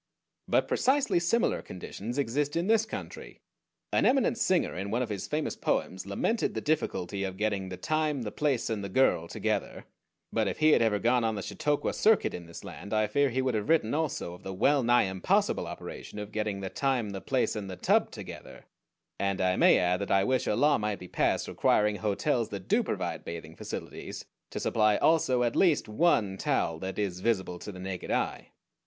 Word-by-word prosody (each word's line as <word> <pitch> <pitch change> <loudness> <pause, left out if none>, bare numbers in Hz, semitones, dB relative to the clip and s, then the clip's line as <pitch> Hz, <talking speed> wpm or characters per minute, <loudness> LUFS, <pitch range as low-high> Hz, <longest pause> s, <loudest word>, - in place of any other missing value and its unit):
But - - +2
precisely 260 -8 +2
similar 230 +8 +1
conditions 105 +6 -7
exist 140 +3 0
in 170 +1 0
this 220 +1 +3
country. - - -8 0.5
An - - +3
eminent 255 -2 +3
singer 185 -6 +2
in 95 +3 -4
one 120 +4 0
of 120 - -5
his 100 -3 -4
famous 150 0 -2
poems 95 +1 -2
lamented 220 - 0
the - - 0
difficulty 100 - -1
of 95 -1 -4
getting 100 -2 -1
the 90 - -6
Time, 155 - 0
the 105 - -4
Place, 140 -3 0
and 105 -2 -2
the 100 - -4
Girl 95 -7 +2
together; - - -2 0.5
but - - +1
if - - -2
he 155 0 +5
had - - +5
ever 110 -2 +3
gone 120 +3 +2
on 110 -1 0
the 100 - -4
Chautauqua 150 -1 -1
circuit 220 -1 +3
in 85 -1 -7
this 85 - -10
land 100 +2 -6
I 110 0 +3
fear 140 +7 +2
he 130 +2 -1
would 130 -1 0
have 110 +5 -2
written 155 -8 +3
also 150 - -2
of 90 - -12
the 95 0 -6
well 140 +8 +3
nigh 120 0 +4
impossible 95 -1 0
operation - - -8
of 105 0 -6
getting 105 -2 -2
the 95 - -4
Time, 130 -6 0
the 95 -1 -6
Place, 130 -3 0
and 100 -2 -5
the 95 - -5
Tub 90 - +2
together; - - -10 0.5
and 100 -1 0
I 95 -1 +2
may - - +6
add 90 0 +2
that 100 - -3
I 95 0 +4
wish 130 +5 +1
a - - +2
law 145 +4 +3
might 105 -1 -1
be 90 - -10
passed - - 0
requiring 105 0 +2
hotels 110 +4 0
that 100 -3 -7
do - - +3
provide - - -3
bathing 80 -1 -7
facilities - - -7 0.2
to - - -5
supply 105 -2 +2
also 130 -6 +3
at 120 -1 0
least 170 -6 +3
one 105 - +2
towel 80 -3 0
that 95 +1 -5
is 95 -4 -2
visible 95 -4 -1
to 105 - -7
the 95 - -10
naked 95 -1 -5
eye. - - -1
110 Hz, 205 wpm, -29 LUFS, 95-145 Hz, 0.5 s, may